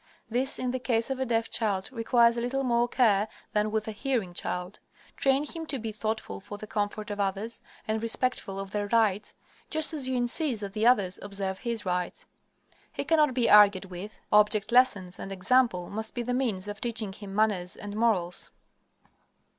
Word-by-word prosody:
This, 255 +4 0
in 250 -1 -2
the 255 - -2
case 235 0 0
of 265 - -2
a 265 - -1
deaf 230 -1 +1
child, 200 -3 -1
requires 235 -1 +3
a 235 - -2
little 265 +3 -1
more 240 -1 +2
care 220 -5 +3 0.3
than 210 0 +1
with 215 0 -2
a - - -2
hearing 220 -4 -2
child. 180 +3 -4 0.4
Train 275 +2 +2
him 325 +1 -4
to 275 - -1
be 225 -2 -4
thoughtful 215 - -4
for 205 - -9
the 215 - -8
comfort 210 0 -3
of 205 - -5
others, 200 +3 -2 0.3
and 220 0 -1
respectful 230 -4 -1
of 195 0 -6
their 205 -1 -2
rights, 210 -2 +1 0.3
just 315 +1 +3
as 275 -4 +1
you 260 - 0
insist 245 0 +2
that 200 -1 -6
the 220 +2 +2
others 200 -7 +3
observe 195 -1 -4
his 235 -4 -3
rights. 180 -1 -2 0.7
He - - -3
cannot 305 -5 +3
be 245 -3 +2
argued 205 -2 +6
with, 190 +3 -9
object 210 +1 +3
lessons 215 -8 +3
and 195 - -6
example 190 -1 +1
must 220 +2 -2
be 240 - -2
the 250 +1 -2
means 220 -7 -1
of 205 +1 -6
teaching 220 -4 -1
him 200 -1 -9
manners 200 -4 +1
and 205 0 -7
morals. 205 -6 0
220 Hz, 190 wpm, -28 LUFS, 200-245 Hz, 0.7 s, argued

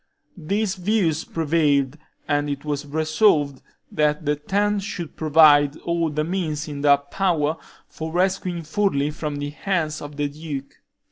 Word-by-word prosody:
These 195 +4 -1
views 180 -5 +1
prevailed, 145 -4 +1 0.3
and 145 0 0
it 140 +1 -4
was 145 -1 -3
resolved 155 -2 +2 0.3
that 150 0 +1
the 150 +1 +2
ten 205 +7 0
should 185 -5 -6
provide 150 -2 +5
all 170 -1 0
the 150 0 -1
means 160 -3 -2
in 145 -2 -6
their 140 -1 +6
power 155 +1 0 0.3
for 160 0 -6
rescuing 180 -1 0
Furli 155 -5 0
from 150 -1 -4
the 145 0 -4
hands 155 -2 -2
of 145 0 -8
the 145 0 0
duke. 145 -2 -7
155 Hz, 145 wpm, -23 LUFS, 145-175 Hz, 0.3 s, their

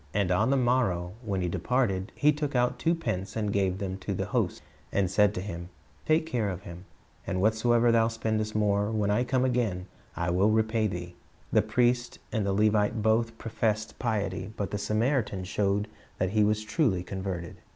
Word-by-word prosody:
And 100 -3 +1
on 90 +7 +3
the 135 - +3
morrow 120 -9 +1
when 100 -5 -2
he 90 - 0
departed, 100 0 0
he 150 +1 +4
took 145 -1 -3
out 125 0 +1
two 165 +1 +2
pence, 100 - -3
and 105 -2 -1
gave 95 -2 +1
them 95 -1 -4
to - - -3
the - - -2
host, - - -1 0.3
and 95 -2 +1
said 105 0 +5
unto, 95 -2 -5
him, 85 -3 -6 0.4
Take 155 +1 +3
care 120 -9 -1
of 95 0 -5
him; 85 +2 -10 0.4
and 95 -1 -1
whatsoever 115 +3 +3
thou 115 -1 +4
spendest 110 -1 -2
more, 105 -1 +2
when 105 -2 0
I 120 +4 +2
come 130 0 +1
again, 115 -8 0 0.3
I 85 +1 -1
will 95 +4 +3
repay 110 0 +2
thee." 90 -2 -5 0.4
The - - +5
priest 120 0 +1
and 110 -3 0
the - - +1
Levite 105 +2 +2
both 115 +1 +2
professed 110 -1 -2
piety, 100 -5 -2
but 100 -1 -3
the 105 - -2
Samaritan 110 -2 0
showed 100 +2 0 0.3
that 95 0 0
he 105 0 +3
was 105 +1 +1
truly 110 - +1
converted. 95 -2 -5
105 Hz, 190 wpm, -28 LUFS, 95-115 Hz, 0.4 s, said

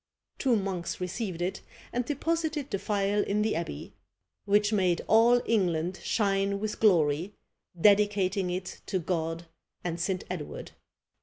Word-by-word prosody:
Two 255 -3 +3
monks 190 -4 -3
received 180 -1 -3
it, 185 - -3 0.3
and 245 - 0
deposited 310 +1 -2
the 195 - -1
phial 205 0 +1
in 205 +1 0
the 215 - 0
abbey, 165 - -5 0.5
"which 210 +1 +3
made 185 -4 +2
all 235 +2 +5
England 180 -4 0
shine 200 -2 +1
with 215 0 -3
glory, 170 -2 +3 0.4
dedicating 200 -1 +3
it 185 +1 -5
to 190 - 0
God 165 -1 -2 0.4
and 175 -1 -3
St. 185 +2 -1
Edward." 175 -5 -6
195 Hz, 135 wpm, -28 LUFS, 180-215 Hz, 0.5 s, all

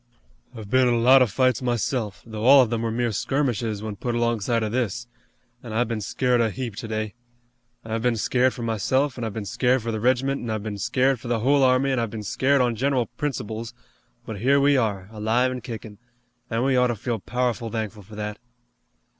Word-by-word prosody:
"I've 110 -3 -8
been 130 -1 +4
in 120 - +3
a - - +1
lot 130 +3 +6
of 125 - +4
fights 130 +5 +1
myself, 120 -3 -2
though 110 -2 -6
all 135 +2 +8
of 120 - -3
them 115 -1 -1
were 115 - -1
mere 120 +1 0
skirmishes 115 -3 -1
when 105 -2 -5
put 120 +2 -2
alongside 115 -1 0
of 105 - -2
this, 120 -1 -1 0.6
an' 115 -3 -8
I've 120 +2 +1
been 115 -2 -3
scared 125 +4 +1
a 115 - +2
heap 120 -1 -5
today. 110 -2 -4 0.7
I've 110 0 -2
been 120 0 +1
scared 125 +3 +1
for 120 - -6
myself, 130 +5 0
an' - - -4
I've 110 -3 -4
been 110 -2 -4
scared 125 +2 +1
for 115 - -2
the 110 - -3
regiment, 130 +4 +1
an' 120 - -5
I've 110 -2 -2
been 105 -2 -5
scared 130 +3 +1
for 120 - -9
the 120 -2 0
whole 140 +4 +3
army, 130 +1 +3
an' 130 - +1
I've 115 -2 -1
been 110 0 -6
scared 135 +6 +2
on 120 -2 +1
general 130 0 +1
principles, 115 -6 -4 0.5
but 110 -3 -6
here 135 +6 +3
we 140 +1 +4
are, 105 -7 0
alive 115 +4 +1
an' 125 -1 -5
kickin', 110 -4 -8 0.5
an' 115 +1 0
we 135 0 +2
ought 125 0 +4
to 120 - -1
feel 115 +1 -3
powerful 120 +1 -2
thankful 110 -2 -4
for 105 +2 -13
that." 105 0 -5
120 Hz, 220 wpm, -24 LUFS, 110-130 Hz, 0.7 s, all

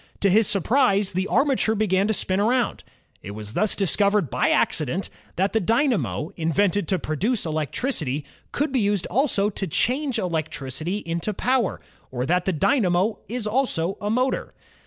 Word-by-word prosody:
To 200 - +3
his 215 +1 +4
surprise 200 -1 +2
the 185 +2 -1
armature 265 -6 +2
began 200 -2 +1
to 220 - +1
spin 190 0 0
around. 240 +4 +1 0.4
It 100 +1 -8
was 105 0 -6
thus 215 +7 +2
discovered 200 -3 +2
by - - +1
accident 155 +5 0 0.2
that 195 +3 0
the 225 - +3
dynamo, 215 - 0
invented 180 +3 +1
to 190 - +1
produce 195 - -1
electricity, 155 - -2 0.3
could 295 0 -1
be 260 - +1
used 205 -3 0
also 215 -4 +1
to 195 -1 -3
change 260 - 0
electricity 160 +1 -3
into 170 +5 -2
power, 250 -3 0 0.3
or 125 -1 -3
that 180 +4 +1
the 190 - +1
dynamo 190 - +1
is 235 +1 -4
also 210 -6 0
a 205 - -2
motor. 255 +4 -1
200 Hz, 155 wpm, -23 LUFS, 170-225 Hz, 0.4 s, his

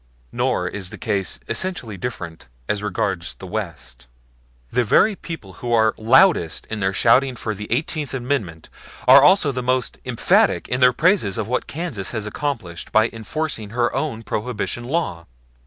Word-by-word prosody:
Nor 90 - 0
is 95 0 -5
the - - -9
case 95 -3 -2
essentially 120 - -2
different 90 - -6 0.2
as 105 -1 -1
regards 95 -3 -2
the - - -10
West; 75 - -6 0.6
the 125 +1 +2
very 205 - +4
people 165 - -8
who 120 - -3
are 110 -1 +4
loudest 110 - +3
in 110 - -3
their 95 -1 +1
shouting 125 +6 +3
for 110 -2 -3
the 105 +1 -8
Eighteenth 145 +3 -1
Amendment 120 - -3 0.4
are 135 +2 +9
also 155 -1 +5
most 130 0 -1
emphatic - - +2
in 125 - -1
their 125 -1 +6
praises 155 - +2
of 110 - -2
what 125 +2 -1
Kansas 140 - -4
accomplished 105 - -4
by 110 +1 +3
enforcing 115 0 -4
her 120 +2 0
own 135 -4 -2
Prohibition 120 +1 -3
law. 130 - -2
115 Hz, 155 wpm, -21 LUFS, 100-135 Hz, 0.6 s, are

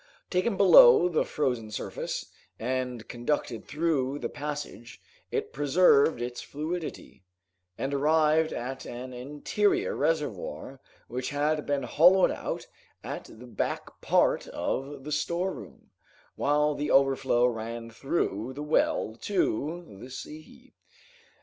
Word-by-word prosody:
Taken 190 +3 +1
below 175 -4 +8
the 165 - +1
frozen 125 -7 -2
surface, 105 - -5 0.3
and 125 -1 -3
conducted 120 -1 -2
through 145 -3 0
the - - -4
passage, 145 -5 -6 0.3
it - - -3
preserved 145 -2 +4
its 120 0 -5
fluidity, 155 - -6 0.5
and 135 +1 -2
arrived 155 +2 +3
at 130 +2 -5
an 125 +1 -7
interior 365 - 0
reservoir - - -2 0.3
which 125 +1 -4
had 150 +1 0
been 140 -2 0
hollowed 175 +9 +5
out - - -4 0.4
at - - -6
the 115 +3 -13
back 120 - -4
part - - +2
of 135 0 -4
the 150 - -6
storeroom, 170 +5 -3 0.4
while 150 +1 +2
the 145 +1 -3
overflow 135 -3 +3
ran 115 -1 -3
through 120 - -2
the 145 +2 -6
well 150 -7 +1
to 165 - -2
the 125 - -10
sea. 155 - -11
145 Hz, 120 wpm, -28 LUFS, 125-160 Hz, 0.5 s, below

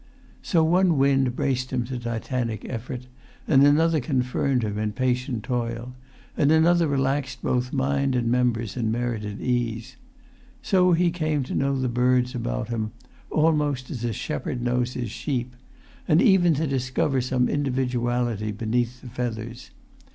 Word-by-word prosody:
So 165 -4 +2
one 175 0 +3
wind 135 -2 +2
braced 130 -1 -1
him 125 -2 0
to 125 0 -5
titanic 120 -1 -3
effort, 125 +1 -5 0.4
and 135 -3 +5
another 155 +3 +4
confirmed 130 -1 0
him 105 -1 -2
in 105 -1 -1
patient 125 -1 -1
toil, 120 -1 -3 0.4
and 145 0 +3
another 165 +1 +4
relaxed 135 -1 -1
both 125 +1 0
mind 140 0 0
and 120 -2 0
members 115 -3 0
in 115 -3 -1
merited 110 -3 -3
ease; 120 0 -2 0.7
so 185 -5 +3
he 170 +1 +3
came 155 -4 -1
to - - -6
know 135 0 0
the 130 - 0
birds 125 +1 +2
about - - -3
him, 110 -2 -3 0.4
almost 150 -4 +1
as 120 -6 -5
a 120 - 0
shepherd 125 +1 -4
knows 125 0 0
his 120 -4 -4
sheep, 125 -2 -3 0.5
and 155 - +4
even 175 -4 +5
to 155 +3 0
discover 130 0 0
some 125 0 +1
individuality 125 -5 -1
beneath 120 +3 -2
the - - -10
feathers. 120 0 -5
125 Hz, 150 wpm, -25 LUFS, 120-140 Hz, 0.7 s, and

